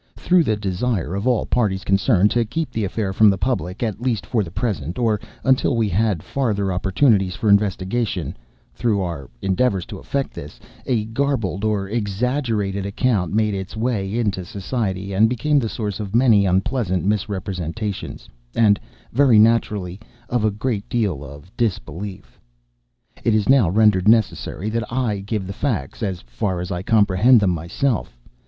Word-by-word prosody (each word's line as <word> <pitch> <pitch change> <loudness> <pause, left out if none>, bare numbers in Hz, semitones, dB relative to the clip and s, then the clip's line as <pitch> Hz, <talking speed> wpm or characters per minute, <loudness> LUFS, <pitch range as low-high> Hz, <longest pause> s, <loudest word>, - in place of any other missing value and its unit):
Through 180 -3 +3
the 110 - +1
desire 100 -1 -2
of 100 +5 -2
all 125 -3 +2
parties 100 -6 0
concerned, 100 0 +3
to 120 - +2
keep 150 +8 -3
the 110 - -2
affair 100 0 -2
from 110 +2 +6
the 100 - +1
public, 95 -2 -2
at 110 -1 -3
least 120 -5 -1
for 115 -4 0
the 85 - -7
present, 85 - -3
or 110 -4 +1 0.2
until 130 -1 +2
we 115 -2 +1
had 100 -3 0
farther 105 -8 -1
opportunities 95 +1 +2
for 110 - 0
investigation—through 100 +1 -1
our 85 -8 -4
endeavors 95 -1 +1
to - - -8
effect 140 -1 -3
this—a 105 - -5
garbled 115 -8 -1
or 105 -2 0
exaggerated 105 -1 -1
account 100 -2 0
made 105 0 +1
its 95 +2 -5
way 110 -3 -1
into 100 -6 -1
society, 100 0 -3
and 110 +4 +4
became 140 +5 +1
the 115 -4 -2
source 105 -3 -4
of 105 0 -4
many 115 -5 +5
unpleasant 95 0 0
misrepresentations; 100 -1 -3 0.3
and, 105 -3 +4 0.3
very 130 -2 +5
naturally, 105 -4 +2 0.3
of 120 -3 0
a 110 - +3
great 105 0 -3
deal 100 - -1
of 75 +6 -12
disbelief. 100 -3 -4 0.8
It 115 - +3
is 105 -2 +1
now 130 -9 +5
rendered 105 -1 +3
necessary 110 -2 +2
that 115 0 -3
I 120 -5 0
give 100 0 -3
the 95 - -5
facts—as 95 - -3
far 75 +10 -3
as 90 +2 -5
I 90 -1 -2
comprehend 105 +3 +4
them 100 -3 +2
myself. 85 - -2
105 Hz, 155 wpm, -21 LUFS, 95-115 Hz, 0.8 s, from